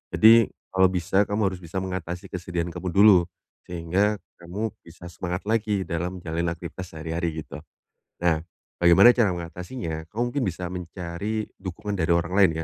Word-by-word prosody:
Jadi, 115 0 +7 0.2
kalau 95 0 +5
bisa, 95 +2 +2
kamu 100 -1 +1
harus 90 - -7
bisa 85 +3 -4
mengatasi 90 -2 -4
kesedihan 90 -1 -3
kamu 90 +1 -4
dulu, 100 -2 +7 0.4
sehingga 90 +5 0 0.2
kamu 100 +5 -4
bisa 85 +1 -12
semangat 90 +2 -4
lagi 105 -3 +1
dalam 90 +2 -3
menjalalani 85 0 -2
aktivitas 90 +2 -8
sehari-hari, 80 0 -3
gitu. - - -11 0.7
Nah, 85 -2 +3 0.4
bagaimana 85 +7 +8
cara 105 -8 +2
mengatasinya? 85 -1 -6
Kamu 120 +3 -1
mungkin 140 -4 0
bisa 90 0 -3
mencari 90 +4 -4
dukungan 95 +2 -5
dari 85 0 +2
orang 85 +2 0
lain 95 -4 +7
90 Hz, 150 wpm, -25 LUFS, 85-100 Hz, 0.7 s, bagaimana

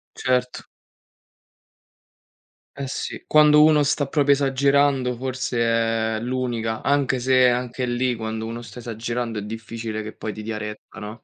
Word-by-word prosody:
Certo. 125 -1 -1 2.1
Eh 140 -1 -4
sì, - - -5
quando 150 0 +6
uno 155 -1 +5
sta 145 0 +1
proprio 145 -1 +3
esagerando 135 -2 +2
forse 130 -1 -3 0.6
è - - -3
l'unica, 120 -2 -2
anche 140 -2 +1
se, 130 0 +4
anche 125 +1 -2
lì, 120 0 0
quando 110 0 -4
uno 115 +1 -5
sta 115 +1 -10
esagerando 115 0 -4
è - - -5
difficile 110 0 -5
che 110 - -7
poi 110 - -5
ti 110 - -8
dia 110 0 -4
retta, 105 +1 -8
no? 110 +2 -8
125 Hz, 145 wpm, -23 LUFS, 115-135 Hz, 2.1 s, quando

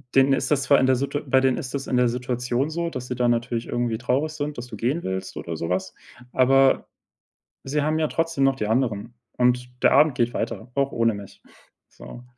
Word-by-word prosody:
Denen 135 0 +5
ist 135 - -1
das 140 -2 +2
zwar 140 - +5
in 130 - +3
der 130 - +4
Situa 140 +3 -2
bei 130 -1 +4
denen 130 -1 +2
ist 130 - -6
das 140 -1 -4
in 125 - 0
der 125 -1 +4
Situation 125 +2 -2
so, 170 +1 -2
dass 130 -5 -6
sie 125 - -3
da 125 0 +1
natürlich 120 0 -1
irgendwie 120 -2 -1
traurig 130 +6 -1
sind, 150 -1 -4
dass 120 0 -6
du 115 - -8
gehen 130 +10 -1
willst 95 0 -4
oder 85 - -5
sowas, 85 +3 -2 0.4
aber 135 +1 +4 0.8
sie 145 +3 -1
haben 155 +1 0
ja 155 - +1
trotzdem 165 -4 0
noch 135 - +3
die 105 -5 -3
anderen 115 -1 -1 0.2
und 125 0 +2
der - - +6
Abend 145 -1 +5
geht 120 0 0
weiter, 115 +2 -4
auch 140 0 +1
ohne 115 -1 +1
mich, 100 -1 -10 0.5
so. 60 - -12
125 Hz, 220 wpm, -24 LUFS, 120-140 Hz, 0.8 s, der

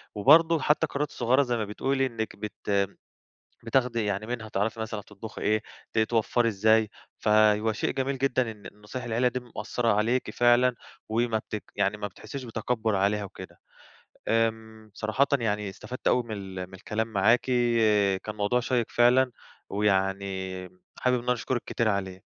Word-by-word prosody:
وبرضه 160 +9 +6
حتى 150 +3 +2
القرارات 145 -1 -2
الصغيّرة 125 +4 +2
زي 120 -2 -1
ما 110 - -1
بتقُولِي 135 +6 0
إنك 115 -3 -4
بت 100 -1 -2 0.7
بتاخدي 115 -2 +1
يعني 105 +2 -2
منها 115 -3 -4
تعرفي 105 +3 -1
مثلًا 110 -1 -4
تطبخي 105 +2 -10
إيه 110 0 +2 0.3
ت 110 - +2
توفّري 115 +1 +2
إزاي 110 +1 +3 0.3
فهو 105 0 +4
شيء - - -1
جميل 135 0 -2
جدًا 130 -3 +1
إن 105 -2 -11
نصايح 105 +4 -8
العيلة 120 +2 +1
دي 125 +1 -2
مؤثرة 115 -1 -1
عليكِ 115 +5 +1
فعلًا 120 +1 +4 0.3
وما 115 0 +1
بتك 105 -1 -6
يعني 100 +2 +1
ما 105 0 -3
بتحسّيش 130 +7 -8
بتكبّر 110 -2 -1
عليها 100 +2 +1
وكده. 100 - -10 0.7
آمم 110 -1 -1
صراحةً 110 +6 +1
يعني 105 -3 -1
استفدت 120 +6 -5
أوي 125 - +3
من 115 -2 -8
ال 95 -2 -6
من 95 - -15
الكلام 110 +4 -3
معاكِ 110 +5 +4 0.8
كان 105 - -5
موضوع 105 +4 +1
شيّق 120 -1 0
فعلًا 125 +1 +4 0.4
ويعني 95 -2 -1 0.3
حابب 125 0 +2
إن - - -6
أنا 125 - +2
أشكرِك 120 0 -2
كتير 115 -2 0
عليه. 95 -2 -1
110 Hz, 160 wpm, -27 LUFS, 105-125 Hz, 0.8 s, وبرضه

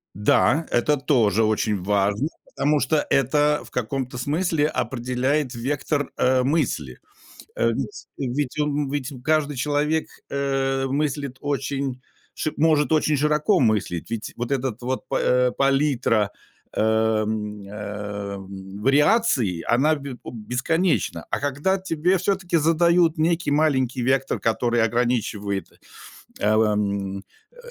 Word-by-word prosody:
Да, 140 - +3
это 145 +5 +2
тоже 115 -7 +2
очень 110 -2 0
важно, 100 +6 +1 0.2
потому 150 +1 0
что 150 +3 +1
это 150 +3 +2
в - - -15
каком-то 125 +1 -3
смысле 150 +3 0
определяет 130 +2 -1
вектор, 140 +3 -2
э, 130 0 +3
мысли. 155 +5 -1 0.6
Э, - - +2
ведь 375 -2 -5
ведь 135 +2 -2
он 145 -1 0
ведь 140 -1 -3
каждый 150 0 +1
человек, 150 +4 0 0.2
э, 135 -1 0
мыслит 140 -1 -2
очень 135 -2 -2 0.3
ш 155 - -2
может 155 -1 +3
очень 155 -1 +3
широко 150 +6 +2
мыслить, 105 -7 0
ведь 115 -2 -4
вот 120 +1 -4
этот 130 -4 -2
вот 125 -2 -3
па, - - 0
э, 125 0 +3
палитра, 135 -7 +2 0.4
э, - - -1
м, 110 -1 0
эм, 100 -1 -7
вариаций- 140 - +3
она 140 +7 +3
б 140 -4 -7
о - - -7
бесконечна. 130 - -1
А - - -1
когда 145 +7 0
тебе 180 0 +1
всё 190 +3 +1
таки 175 -3 -1
задают 170 +1 +3
некий 165 0 +1
маленький 135 -4 +1
вектор, 135 +2 +1
который 120 +1 +1
ограничивает, 110 -5 -1 0.7
э, 105 +1 +3
в, 110 - +5
эм, 100 -2 -1 0.3
э, - - -27
135 Hz, 130 wpm, -23 LUFS, 110-150 Hz, 0.7 s, в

